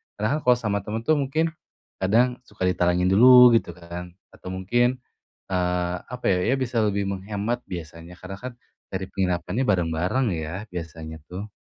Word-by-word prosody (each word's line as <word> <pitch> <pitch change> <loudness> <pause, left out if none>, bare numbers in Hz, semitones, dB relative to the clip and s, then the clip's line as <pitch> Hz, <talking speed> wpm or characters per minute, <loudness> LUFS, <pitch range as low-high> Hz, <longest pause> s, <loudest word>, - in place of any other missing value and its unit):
Karena 110 +8 0
kan - - -3
kalau 125 - +8
sama 105 -4 -1
teman 110 +2 -3
tuh, 155 +4 +3
mungkin, 155 +4 0 0.5
kadang 120 +6 +2
suka - - -19
ditalangin 90 0 +2
dulu 125 +4 +9
gitu 85 - -4
kan, 90 0 -8 0.2
atau - - -13
mungkin, 120 +7 +1 0.6
eee, 90 -1 0 0.2
apa 125 0 -7
ya, 90 - +3
ya - - +4
bisa 120 -3 0
lebih 100 -1 0
menghemat 100 +5 -3
biasanya, 85 0 -8
karena 95 +1 -7
kan 130 0 -5 0.4
dari 95 0 -2
penginapannya 90 +5 -1
bareng-bareng 90 +7 +1
ya, 80 +1 -5 0.2
biasanya 80 -2 -7
tuh. 100 +3 -7
95 Hz, 160 wpm, -24 LUFS, 90-120 Hz, 0.6 s, dulu